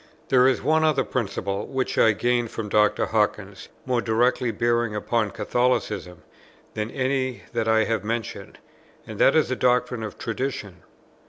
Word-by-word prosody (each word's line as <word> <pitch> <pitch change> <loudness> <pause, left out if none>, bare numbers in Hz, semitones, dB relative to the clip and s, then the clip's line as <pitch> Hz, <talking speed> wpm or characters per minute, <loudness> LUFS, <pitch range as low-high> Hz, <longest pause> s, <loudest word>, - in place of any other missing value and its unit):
There 130 -1 +5
is 130 - +1
one 160 +1 +3
other 155 -3 +2
principle, 100 -4 -3
which 130 -1 -2
I 110 - +5
gained 120 +2 0
from 110 -1 -5
Dr. 105 +1 +3
Hawkins, - - -2 0.2
more 125 -2 0
directly 120 +2 +1
bearing 115 0 0
upon 110 +1 0
Catholicism, 100 -9 -1 0.5
than 105 0 -3
any 130 -1 -2
that 115 -2 -1
I 110 0 +4
have 115 0 -1
mentioned; 115 +1 -5 0.5
and - - -9
that 135 - +5
is 155 -5 +3
the 130 - 0
doctrine 125 -1 +1
of 110 -2 -6
Tradition. 115 -5 -4
120 Hz, 155 wpm, -24 LUFS, 110-125 Hz, 0.5 s, There